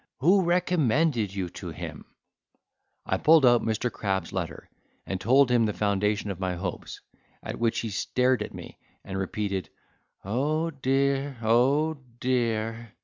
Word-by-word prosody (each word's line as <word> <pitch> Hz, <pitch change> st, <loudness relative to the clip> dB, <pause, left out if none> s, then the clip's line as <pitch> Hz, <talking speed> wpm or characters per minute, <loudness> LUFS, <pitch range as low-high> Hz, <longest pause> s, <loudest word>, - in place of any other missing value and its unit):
Who 185 Hz, +8 st, +4 dB
recommended 160 Hz, -, +1 dB
you 95 Hz, -2 st, -2 dB
to -, -, -8 dB
him?" -, -, -7 dB, 1.0 s
I -, -, 0 dB
pulled 155 Hz, -3 st, +5 dB
out 120 Hz, -1 st, +5 dB
Mr. 115 Hz, +2 st, -1 dB
Crab's 95 Hz, -2 st, -2 dB
letter, 85 Hz, -5 st, -4 dB, 0.4 s
and 95 Hz, -1 st, -4 dB
told 130 Hz, +5 st, +4 dB
him 115 Hz, -2 st, +4 dB
the 105 Hz, -, -2 dB
foundation 105 Hz, 0 st, 0 dB
of 95 Hz, -, -7 dB
my 95 Hz, -1 st, -1 dB
hopes, 90 Hz, 0 st, -6 dB, 0.4 s
at -, -, -6 dB
which 115 Hz, -1 st, +1 dB
he 115 Hz, -, -4 dB
stared 125 Hz, +5 st, +1 dB
at -, -, -4 dB
me, -, -, -10 dB, 0.3 s
and 95 Hz, -, -6 dB
repeated 95 Hz, -2 st, -3 dB, 0.6 s
"Oh 150 Hz, +10 st, 0 dB
dear! 135 Hz, 0 st, 0 dB
Oh 135 Hz, +7 st, +3 dB, 0.2 s
dear!" 115 Hz, -3 st, -1 dB
120 Hz, 145 wpm, -27 LUFS, 100-140 Hz, 1.0 s, pulled